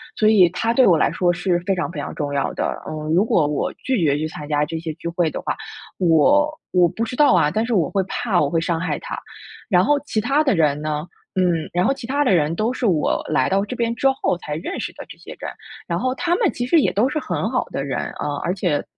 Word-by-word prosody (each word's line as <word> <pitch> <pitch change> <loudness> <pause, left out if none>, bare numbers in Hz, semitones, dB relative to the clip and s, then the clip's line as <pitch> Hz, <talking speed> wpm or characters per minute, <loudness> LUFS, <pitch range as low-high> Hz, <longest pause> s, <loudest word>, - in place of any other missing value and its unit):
所 215 - +3
以 200 -5 +6
他 225 +6 -1
对 255 +1 +5
我 175 -4 +5
来 - - +2
说 175 -1 +1
是 175 0 0
非 195 -1 +1
常 180 - -2
非 160 - -6
常 145 - -5
重 145 -1 -3
要 140 -1 -1
的， - - -3
嗯。 155 0 -3
如 185 +5 +4
果 170 -8 +2
我 145 0 -1
拒 260 -4 -2
绝 145 -2 +2
去 155 - -2
参 150 -1 -8
加 150 -1 +1
这 165 +2 -5
些 160 -1 -5
聚 170 - -8
会 170 -1 0
的 - - -5
话， - - -2 0.4
我 190 - +4 0.2
我 180 -1 +4
不 225 - -3
知 230 - -4
道 295 -6 +5
啊， 155 -4 +3
但 220 +6 0
是 240 - -2
我 170 -9 +2
会 195 - +1
怕 225 -2 -1
我 145 - +1
会 165 - +1
伤 165 0 -1
害 175 - -2
他。 - - -6 0.5
然 180 -4 +4
后 290 +7 +3
其 220 - -1
他 275 +7 +2
的 270 -8 +2
人 150 -3 +2
呢， 150 0 -2 0.3
嗯 175 -4 +1
然 180 +1 +2
后 270 - +3
其 270 -3 -9
他 285 +3 +1
的 225 - +3
人 160 -1 +2
都 215 +6 0
是 255 - -3
我 170 -8 +1
来 155 - +2
到 195 +1 +2
这 230 - -6
边 235 -1 0
之 270 - +2
后 180 - +1
才 150 -4 -5
认 180 - -5
识 - - -4
的 - - -10
这 - - -11
些 - - -11
人， - - -5 0.4
然 - - -1
后 255 0 0
他 345 +4 0
们 435 -7 +2
其 245 - -3
实 320 +6 +4
也 - - +1
都 215 +6 +3
是 305 - -1
很 240 - -2
好 255 - 0
的 135 - -3
人， 140 -2 -2 0.2
呃， 145 - -2
而 175 - 0
且 175 -7 0
180 Hz, 290 characters per minute, -21 LUFS, 155-235 Hz, 0.5 s, 以